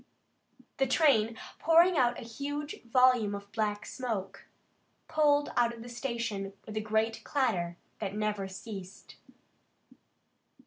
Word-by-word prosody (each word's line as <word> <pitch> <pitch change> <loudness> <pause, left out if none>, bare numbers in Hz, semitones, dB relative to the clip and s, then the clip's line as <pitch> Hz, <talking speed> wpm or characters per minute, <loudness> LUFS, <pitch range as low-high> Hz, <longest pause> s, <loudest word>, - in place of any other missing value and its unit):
The 270 - +2
train, 235 -6 +3 0.2
pouring 335 +2 +5
out 245 -4 +3
a - - -7
huge 285 +6 -5
volume 245 -4 +4
of 200 0 -9
black 210 -1 -1
smoke, 205 -7 -4 0.6
pulled 295 -2 +3
out 235 -1 +2
of 225 - -10
the 240 - -9
station 235 -5 -3
with 215 - -8
a 215 - 0
great 220 +1 0
clatter 175 -12 0 0.2
that 195 - -3
never 210 -2 -1
ceased. 195 -1 -9
230 Hz, 125 wpm, -30 LUFS, 205-265 Hz, 0.6 s, pouring